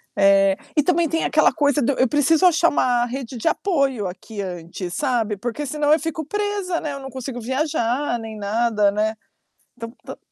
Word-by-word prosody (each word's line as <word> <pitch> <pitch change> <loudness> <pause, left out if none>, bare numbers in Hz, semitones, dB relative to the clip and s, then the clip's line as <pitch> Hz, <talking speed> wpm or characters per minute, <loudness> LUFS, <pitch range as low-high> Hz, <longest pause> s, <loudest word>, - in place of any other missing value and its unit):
Eh, 195 0 +4 0.2
e 300 - +5
também 340 -1 +2
tem 325 0 0
aquela 305 0 +3
coisa 290 0 +1
do 270 +3 +1
eu 260 - +3
preciso 295 +5 +3
achar 335 -1 +5
uma 245 -3 +1
rede 250 0 -6
de 230 - -3
apoio 275 - 0
aqui 200 +4 -7
antes, 175 0 -6
sabe. 235 -5 0
Porque, 240 +7 -4
senão, 295 +1 0
eu 310 - +5
fico 320 0 -4
presa, 410 -1 -2
né, 295 -2 -4
eu 275 - -6
não 270 0 -8
consigo 260 -1 -6
viajar 260 -1 -1
nem 220 -1 -8
nada, 210 0 +1
né. 215 +2 -1 0.6
Então, 230 -1 -6
tan - - -8
260 Hz, 185 wpm, -22 LUFS, 220-300 Hz, 0.6 s, e